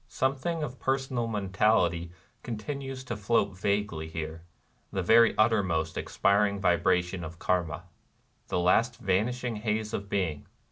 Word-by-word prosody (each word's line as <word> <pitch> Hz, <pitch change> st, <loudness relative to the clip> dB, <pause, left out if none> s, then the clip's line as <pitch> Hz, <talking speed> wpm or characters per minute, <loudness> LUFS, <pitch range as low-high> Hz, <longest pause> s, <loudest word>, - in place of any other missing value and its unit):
Something 140 Hz, +5 st, -1 dB
of 130 Hz, -3 st, -6 dB
personal 130 Hz, -3 st, -1 dB
mentality 95 Hz, -5 st, +1 dB, 0.3 s
continues 130 Hz, +3 st, -5 dB
to 120 Hz, -2 st, -4 dB
float 100 Hz, -2 st, +1 dB
vaguely 100 Hz, -4 st, -1 dB
here, 80 Hz, 0 st, -5 dB, 0.3 s
— -, -, -40 dB
the 95 Hz, -, -1 dB
very 115 Hz, +5 st, +5 dB
uttermost 95 Hz, -8 st, +2 dB
expiring 100 Hz, 0 st, +1 dB
vibration 90 Hz, 0 st, +1 dB
of 85 Hz, +1 st, -8 dB
Karma, 85 Hz, -2 st, -1 dB, 0.3 s
— -, -, -41 dB
the -, -, -1 dB
last 115 Hz, +7 st, +3 dB
vanishing 115 Hz, +3 st, 0 dB
haze 110 Hz, 0 st, -2 dB
of 100 Hz, 0 st, -4 dB
being. 85 Hz, -8 st, -2 dB
100 Hz, 135 wpm, -28 LUFS, 90-115 Hz, 0.3 s, very